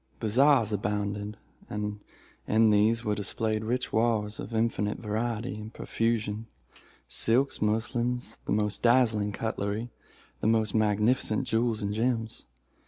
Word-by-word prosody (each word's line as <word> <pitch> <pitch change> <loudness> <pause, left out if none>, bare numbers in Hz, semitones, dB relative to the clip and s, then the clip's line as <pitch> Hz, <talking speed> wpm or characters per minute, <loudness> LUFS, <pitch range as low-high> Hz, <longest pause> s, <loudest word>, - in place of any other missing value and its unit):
Bazaars 115 0 +4
abounded; 105 0 -2 0.3
and 105 0 -3 0.5
in 110 0 +4
these 110 +3 +3
were 105 - +1
displayed 110 +1 -1
rich 125 +3 -2
wares 110 -2 +1
in - - -5
infinite 110 -2 0
variety 115 +1 -2
and 105 +1 -8
profusion—silks, 115 +3 -2
muslins, 115 +3 -1
the - - -2
most 105 0 0
dazzling 115 -4 +3
cutlery, 110 +2 -3 0.5
the 105 - 0
most 110 -2 +2
magnificent 110 +3 +2
jewels 115 -2 0
and 100 0 -1
gems. 115 0 -1
110 Hz, 115 wpm, -28 LUFS, 105-115 Hz, 0.5 s, Bazaars